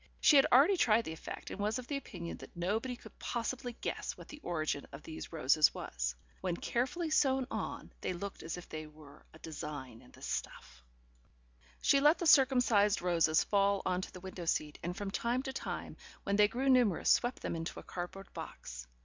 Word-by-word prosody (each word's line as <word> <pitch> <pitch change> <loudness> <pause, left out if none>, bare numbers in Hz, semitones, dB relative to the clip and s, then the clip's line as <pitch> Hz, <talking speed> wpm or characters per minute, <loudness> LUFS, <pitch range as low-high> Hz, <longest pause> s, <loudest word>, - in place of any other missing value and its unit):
She 300 - +6
had 275 - +7
already 295 +10 +6
tried 225 -6 +4
the 160 - -4
effect, 160 - -7
and - - -6
was 210 +3 0
of 255 - -6
the 285 - -3
opinion 175 -10 -7
that - - -13
nobody 220 +8 -1
could - - -15
possibly 245 +1 -3
guess - - -3
what - - -12
the 300 - -9
origin 155 - -2
of 140 +2 -10
these 160 - -7
roses 155 -1 +4
was. - - -3 0.3
When 180 -2 -1
carefully 310 +7 -1
sewn 265 -3 +3
on - - -4
they - - -1
looked 195 +3 -6
as 165 +2 -4
if 180 - -9
they 155 0 -6
were 150 -2 -15
a - - -14
design 145 -7 -7
in - - -18
the - - -16
stuff. 60 0 -5 1.0
She 275 - +5
let 295 +4 +5
the 345 - -3
circumcised 245 - +5
roses 165 -3 +3
fall 200 -1 +2
on 185 0 +1
to - - -6
the 180 - -10
window 185 -2 -7
seat, 150 -2 -1
and 175 +2 -4
from 200 -1 -3
time 240 +5 0
to 265 -2 -4
time, - - -5 0.3
when 200 - 0
they 210 0 +6
grew 255 +5 -2
numerous, 245 -9 +4
swept 245 0 +2
them - - -2
into 165 0 -4
a - - -11
cardboard 180 +2 -7
box. - - -8
195 Hz, 200 wpm, -33 LUFS, 160-250 Hz, 1.0 s, had